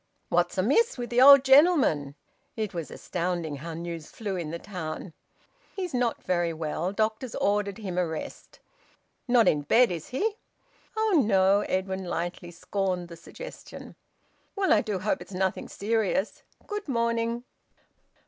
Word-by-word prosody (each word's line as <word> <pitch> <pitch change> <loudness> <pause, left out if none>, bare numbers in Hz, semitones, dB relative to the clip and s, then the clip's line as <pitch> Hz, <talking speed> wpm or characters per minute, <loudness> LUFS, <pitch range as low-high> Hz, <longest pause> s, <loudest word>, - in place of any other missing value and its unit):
"What's 175 +2 +1
amiss 280 - +2
with 245 -1 -5
th' 240 - +2
old 275 0 +10
gentleman?" 265 - +4 0.4
It 215 -3 -3
was 170 -3 -5
astounding 170 -4 -3
how 165 +3 -7
news 170 -1 -6
flew 205 -4 -5
in 170 -4 -4
the 165 - -4
town! 170 -2 -6 0.6
"He's 365 -5 -4
not 245 -2 0
very 175 -2 0
well. 160 +3 -3
Doctor's 220 +3 -2
ordered 205 -1 0
him 190 -5 -3
a 180 - +1
rest." 160 -1 -7 0.7
"Not 240 -2 +4
in 150 - +3
bed, 230 - +4
is 165 -3 -5
he?" 420 - -1 0.6
"Oh 430 -8 +3
no!" 195 -1 +4
Edwin 190 0 -1
lightly 175 0 -4
scorned 180 0 -3
the 170 - -9
suggestion. - - -11 0.6
"Well, 395 -2 +3
I 210 - +4
do 210 -3 -2
hope 190 +3 -1
it's - - -11
nothing 190 0 -1
serious. 215 -1 -1 0.2
Good 415 -3 -5
morning." 235 -1 0
195 Hz, 150 wpm, -27 LUFS, 175-240 Hz, 0.7 s, old